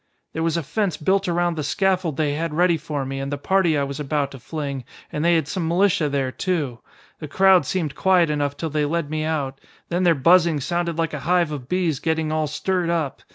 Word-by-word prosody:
"There 160 - -3
was 165 0 +1
a 170 - -2
fence 185 +5 -1
built 190 +5 +1
around 175 0 +1
the 155 - -2
scaffold 180 0 0
they 150 -2 +1
had 160 +1 -3
ready 175 0 +4
for 150 -3 -4
me 135 +1 -4
and 135 +1 -4
the 145 - -2
party 180 0 +2
I 140 - +1
was 140 +1 -5
about 145 -1 -1
to 135 - -10
fling, 140 -1 -5 0.3
and 150 - -2
they 170 0 +4
had 160 -4 +1
some 170 -1 -2
militia 170 -3 +2
there, 135 -2 -1
too. 150 - -2 0.4
The 155 - -6
crowd 190 +3 +4
seemed 165 -7 -1
quiet 180 -4 +3
enough 145 -1 -1
till 160 -2 -3
they 150 0 +1
led 155 0 -2
me 155 0 -1
out. 140 -4 -2 0.3
Then 175 +1 0
their 175 -2 +4
buzzing 165 +2 +4
sounded 170 +3 -2
like 165 -1 -1
a 150 - -3
hive 175 -3 +3
of 135 -4 -6
bees 175 -6 0
getting 160 -1 -1
all 155 -1 0
stirred 175 +3 -1
up. 155 -8 -1
160 Hz, 230 wpm, -22 LUFS, 145-175 Hz, 0.4 s, ready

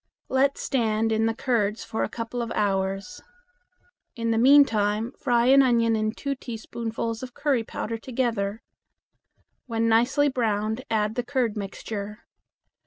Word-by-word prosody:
Let 270 +1 +2
stand 225 -3 0
in 220 0 +2
the 225 - -1
curds 225 -4 0
for 220 - -3
a - - -2
couple 230 +2 -4
of 230 - -4
hours. 195 -1 -1 0.9
In 230 -1 -1
the 225 - +2
meantime 230 -5 +4
fry 240 -3 +2
an 270 +2 +7
onion 230 -3 +3
and 215 0 -1
two 280 -1 -2
teaspoonfuls 230 -2 -5
of 255 -1 -8
curry 285 -5 +1
powder 225 +1 -5
together. 230 -4 -2 1.0
When 230 -1 0
nicely 245 +6 +3
browned 220 -2 -1
add 215 -1 +1
the 245 - -2
curd 250 -4 -1
mixture. 210 +1 -6
230 Hz, 140 wpm, -25 LUFS, 215-250 Hz, 1.0 s, an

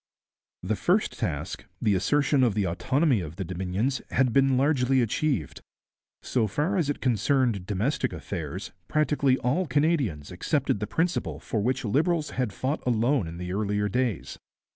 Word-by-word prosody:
The 105 +4 0
first 185 - +1
task, 75 -3 -3
the 105 - +2
assertion 140 +9 +2
of 115 -5 +2
the 105 -2 +1
autonomy 130 - +1
of 80 -1 -7
the 95 - -3
Dominions, 95 +9 -2
had 130 -3 +2
been 135 -1 +4
largely 135 -2 +3
achieved. 120 - -1 0.6
So 115 -4 +1
far 150 - 0
as 165 -6 +1
it 145 - -2
concerned 120 -4 +1
domestic 115 +6 0
affairs, 90 +1 -5 0.2
practically 145 - +2
all 160 +10 0
Canadians 140 - 0
accepted 130 - 0
the 105 - -3
principle 170 +2 -1
for 110 - -2
which 130 +3 0
Liberals 155 - +1
had 125 -5 -1
fought 130 +9 -2
alone 120 - +1
in 85 +1 -7
the 90 +1 -4
earlier 105 0 0
days. 120 -2 -2
125 Hz, 155 wpm, -27 LUFS, 100-140 Hz, 0.6 s, been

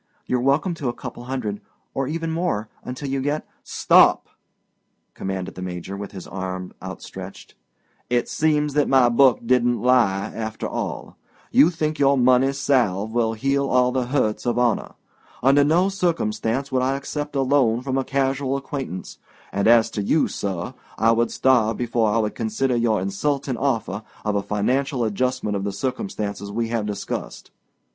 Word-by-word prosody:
You're 125 -1 0
welcome 140 +8 +2
to 145 -6 -3
a - - -2
couple 120 -1 -8
hundred—or 125 +1 -5
even 165 +2 -3
more—until 130 -4 -3
you 135 0 -1
get——" 145 +3 -1 0.2
"Stop!" - - +4 0.8
commanded 95 -1 -4
the 90 - -8
Major, 90 +1 -5
with 100 0 -7
his 95 -3 -8
arm 95 -1 -5
outstretched. - - -9 0.6
"It 120 0 +1
seems 150 -2 +1
that 145 0 +2
my 130 -2 +5
book 130 +1 +4
didn't 120 0 +2
lie, 110 -6 +2
after 110 -1 -4
all. - - -5 0.3
You 155 - +6
think 155 -3 -2
your 140 0 +4
money 130 +1 +4
salve 120 -7 +1
will 115 -2 +1
heal 135 +4 0
all 125 0 +3
the 125 -1 -1
hurts 125 -4 0
of 120 - +1
honor. 120 -2 0 0.5
Under 140 +2 +5
no 165 +6 +3
circumstances 140 - -1
would 130 -1 +1
I 130 +1 +1
accept 145 +1 -5
a 135 - +2
loan 130 -4 +2
from 135 0 -1
a - - 0
casual 135 0 0
acquaintance; 135 -9 -6 0.3
and 100 +2 0
as 115 -1 +5
to 105 - -2
you, 150 +10 +2
sir, 95 -4 -4 0.2
I 115 +1 +4
would 115 +1 +2
starve 115 -4 +2
before 115 -2 +1
I 105 - +1
would 105 -2 0
consider 120 +3 -1
your 115 -2 +2
insulting 130 +8 -1
offer 115 -6 -1 0.2
of 105 - +1
a 100 - +1
financial 125 +6 0
adjustment 115 0 -1
of 100 - -2
the 100 - -2
circumstances 105 - -4
we 115 +2 -2
have 115 -3 -1
discussed. 100 -1 -5
125 Hz, 165 wpm, -23 LUFS, 105-135 Hz, 0.8 s, You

